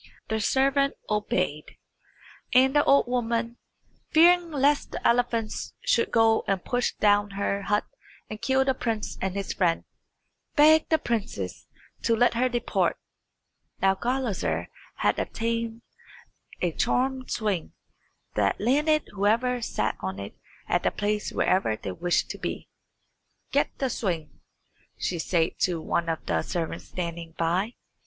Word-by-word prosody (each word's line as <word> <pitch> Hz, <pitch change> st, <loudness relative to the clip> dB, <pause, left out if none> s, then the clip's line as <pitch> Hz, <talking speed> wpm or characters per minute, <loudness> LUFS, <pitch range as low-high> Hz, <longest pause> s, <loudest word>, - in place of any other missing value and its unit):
The 220 Hz, 0 st, 0 dB
servant 275 Hz, +5 st, +2 dB, 0.2 s
obeyed, 180 Hz, -7 st, -1 dB, 0.8 s
and 265 Hz, +2 st, +5 dB
the 290 Hz, -, +5 dB
old 280 Hz, -, +5 dB
woman, 235 Hz, -1 st, -1 dB, 0.5 s
fearing 345 Hz, +2 st, +5 dB
lest 285 Hz, -1 st, +2 dB
the -, -, 0 dB
elephants 235 Hz, -2 st, 0 dB
should -, -, +2 dB
go 225 Hz, -1 st, +4 dB
and 195 Hz, -2 st, -1 dB
push 245 Hz, 0 st, 0 dB
down 205 Hz, 0 st, +3 dB
her 200 Hz, 0 st, 0 dB
hut 205 Hz, +1 st, 0 dB, 0.4 s
and 215 Hz, 0 st, -8 dB
kill 265 Hz, 0 st, +2 dB
the 265 Hz, -, +2 dB
prince 225 Hz, -4 st, -3 dB
and 190 Hz, 0 st, -2 dB
his 200 Hz, -1 st, -3 dB
friend, 170 Hz, -3 st, +1 dB, 0.7 s
begged 315 Hz, +1 st, +6 dB
the 320 Hz, -, +4 dB
princess 200 Hz, -, -3 dB, 0.3 s
to 230 Hz, -, +2 dB
let 245 Hz, +2 st, +3 dB
her 250 Hz, +2 st, +1 dB
depart. 240 Hz, -1 st, 0 dB, 0.8 s
Now 195 Hz, 0 st, +4 dB
Gulizar 245 Hz, 0 st, -1 dB, 0.3 s
had -, -, +1 dB
obtained 230 Hz, 0 st, -2 dB, 0.8 s
a 175 Hz, -, +2 dB
charmed 260 Hz, +8 st, 0 dB
swing, 205 Hz, -7 st, -2 dB, 0.6 s
that 100 Hz, -1 st, +1 dB
landed 300 Hz, +7 st, +2 dB
whoever 230 Hz, +5 st, +1 dB
sat 110 Hz, -, -1 dB
on 95 Hz, 0 st, -4 dB
it 100 Hz, 0 st, -7 dB, 0.3 s
at -, -, +1 dB
the -, -, +2 dB
place 210 Hz, 0 st, -2 dB
wherever 185 Hz, -, +1 dB
they 100 Hz, -, -5 dB
wished 175 Hz, -, 0 dB
to -, -, -8 dB
be. -, -, -4 dB, 0.8 s
"Get -, -, +1 dB
the 265 Hz, -2 st, -1 dB
swing," 170 Hz, -9 st, -3 dB, 0.6 s
she 175 Hz, -, -2 dB
said 165 Hz, 0 st, 0 dB
to 175 Hz, -3 st, +1 dB
one 170 Hz, +1 st, -1 dB
of 160 Hz, -, -3 dB
the -, -, +1 dB
servants 165 Hz, -2 st, -4 dB
standing 170 Hz, -2 st, -5 dB
by. 180 Hz, +8 st, 0 dB
225 Hz, 140 wpm, -26 LUFS, 185-255 Hz, 0.8 s, begged